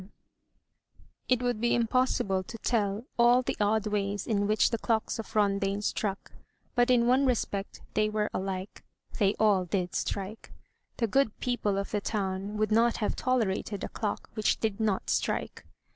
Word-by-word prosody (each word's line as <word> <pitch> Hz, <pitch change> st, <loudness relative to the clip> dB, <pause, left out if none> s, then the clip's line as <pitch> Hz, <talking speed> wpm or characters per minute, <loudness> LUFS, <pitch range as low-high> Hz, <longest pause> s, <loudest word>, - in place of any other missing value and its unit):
MY -, -, -12 dB
BOOK -, -, -19 dB
HOUSE -, -, -36 dB, 0.2 s
It 250 Hz, -1 st, +3 dB
would 245 Hz, -3 st, -1 dB
be 240 Hz, -, +3 dB
impossible 230 Hz, -5 st, +1 dB
to 205 Hz, +5 st, -9 dB
tell 210 Hz, -1 st, 0 dB
all 240 Hz, +2 st, +6 dB
the -, -, -2 dB
odd 210 Hz, +1 st, +2 dB
ways 205 Hz, -1 st, -1 dB
in 205 Hz, -3 st, +1 dB
which 215 Hz, 0 st, +3 dB
the 230 Hz, -, -1 dB
clocks 225 Hz, 0 st, 0 dB
of 225 Hz, -, -7 dB
Rondaine 200 Hz, -1 st, +1 dB
struck; 200 Hz, -2 st, -2 dB, 0.4 s
but 245 Hz, 0 st, +3 dB
in 240 Hz, -2 st, +4 dB
one 260 Hz, +3 st, +4 dB
respect 205 Hz, -5 st, -2 dB
they 215 Hz, 0 st, +2 dB
were 210 Hz, 0 st, 0 dB
alike; 190 Hz, 0 st, -4 dB, 0.4 s
they 200 Hz, -1 st, +3 dB
all 205 Hz, -4 st, +4 dB
did 180 Hz, 0 st, -2 dB
strike. 200 Hz, +3 st, -4 dB, 0.5 s
The 235 Hz, -, +1 dB
good 250 Hz, 0 st, +1 dB
people 230 Hz, -5 st, 0 dB
of 200 Hz, -, -3 dB
the 210 Hz, -, 0 dB
town 200 Hz, 0 st, -2 dB
would 215 Hz, 0 st, 0 dB
not 230 Hz, +2 st, +3 dB
have 210 Hz, -, -1 dB
tolerated 215 Hz, -5 st, -1 dB
a -, -, -3 dB
clock 210 Hz, -2 st, -3 dB
which 215 Hz, -1 st, +1 dB
did 215 Hz, -3 st, -1 dB
hot 215 Hz, -3 st, 0 dB
strike. -, -, -2 dB
215 Hz, 175 wpm, -29 LUFS, 200-235 Hz, 0.5 s, all